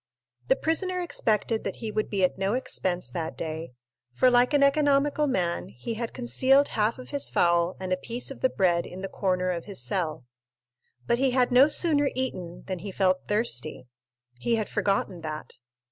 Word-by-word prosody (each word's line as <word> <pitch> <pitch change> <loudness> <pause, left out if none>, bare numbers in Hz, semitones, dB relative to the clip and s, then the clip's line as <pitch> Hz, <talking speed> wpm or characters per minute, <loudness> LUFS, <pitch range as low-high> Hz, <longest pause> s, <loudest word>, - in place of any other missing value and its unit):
The - - +4
prisoner 365 +2 -1
expected 225 - 0
that - - -3
he 220 -2 -5
would 215 0 -1
be 195 -2 0
at 185 - +2
no 195 +4 0
expense 180 - -1
that 160 +3 -4
day, 160 -2 -5 0.4
for 255 - +4
like 245 +1 +4
an 290 -1 +4
economical 290 +1 +3
man 175 -9 -1
he 120 - -6
had 230 +1 -4
concealed 265 +3 +3
half 215 +1 0
of 255 - -10
his 285 -1 -1
fowl 170 +1 +2
and 185 -1 -2
a - - +1
piece 240 +7 -5
of 275 - -9
the 260 - +3
bread 175 -6 +1
in 185 +2 -9
the - - -2
corner 185 -2 0
of 170 -2 -4
his 200 -8 -6
cell. 155 -2 -2 0.8
But 235 - +1
he 270 0 +3
had 250 0 +3
no 255 +3 +7
sooner 295 -2 +2
eaten 185 -10 -4
than 185 -2 -4
he 195 +3 -6
felt 185 -1 +1
thirsty; 205 - 0 0.5
he 230 - +1
had 220 -2 -2
forgotten 195 -3 -1
that. 155 -1 -6
210 Hz, 190 wpm, -27 LUFS, 180-260 Hz, 0.8 s, no